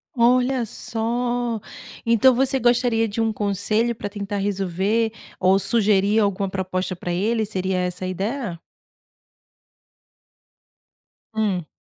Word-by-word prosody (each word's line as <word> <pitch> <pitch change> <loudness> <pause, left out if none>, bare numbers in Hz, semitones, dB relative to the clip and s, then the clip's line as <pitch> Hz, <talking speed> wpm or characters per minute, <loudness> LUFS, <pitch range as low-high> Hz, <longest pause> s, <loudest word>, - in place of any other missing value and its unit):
Olha 250 +1 +3
só. 235 +1 -2 0.5
Então 230 +3 +5
você 265 +2 +1
gostaria 240 -2 +2
de 215 +2 -2
um 225 0 +1
conselho 215 +3 0
pra 205 - -5
tentar 200 0 -4
resolver 200 +3 0 0.3
ou 190 +1 +4
sugerir 205 0 +2
alguma 200 -2 +1
proposta 185 -1 -2
pra 175 0 -5
ele, 220 +5 +1
seria 190 -2 -2
essa 180 0 -2
a - - -2
ideia? 195 0 -3 2.7
Hum. 200 -7 -1
210 Hz, 110 wpm, -23 LUFS, 190-235 Hz, 2.7 s, Então